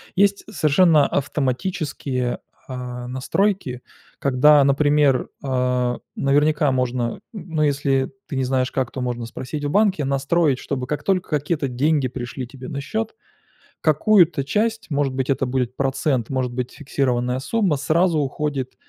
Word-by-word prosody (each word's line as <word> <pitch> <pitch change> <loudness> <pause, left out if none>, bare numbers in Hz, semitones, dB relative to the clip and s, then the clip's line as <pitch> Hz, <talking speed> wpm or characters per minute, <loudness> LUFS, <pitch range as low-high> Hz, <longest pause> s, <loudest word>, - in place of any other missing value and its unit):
есть 200 +1 +2
совершенно 155 -2 +4
автоматические, 135 -2 -2 0.3
а, 125 -1 -6
настройки, 130 +1 -1 0.4
когда, 140 +2 +5
например, 145 -1 +3
а, 125 -2 0 0.2
наверняка 150 +1 +2
можно, 125 -1 0
н - - -15
ну, 165 -7 -2
если 140 -2 +1 0.2
ты 140 - -5
не 130 - +1
знаешь 130 0 0
как, 130 -2 -1
то 130 - -5
можно 120 -1 -3
спросить 130 +5 -6
в - - 0
банке, 195 -3 +2
настроить, 140 +1 +1
чтобы, 130 -3 -4
как 150 - -3
только 185 -2 0
какие-то 150 -1 -1
деньги 140 +2 +1
пришли 125 0 -6
тебе 130 0 -10
на 140 - -4
счёт, 220 +8 -3 0.7
какую-то 165 -1 +4
часть, 220 +6 -1
может 140 -2 0
быть, 130 +1 -2
это 135 0 +1
будет 125 -1 -1
процент, 135 -3 0
может 130 -2 -1
быть, 125 0 -3
фиксированная 125 -3 -1
сумма, 195 0 +1
сразу 160 +4 +2
уходит 140 -2 -2
140 Hz, 145 wpm, -22 LUFS, 130-155 Hz, 0.7 s, когда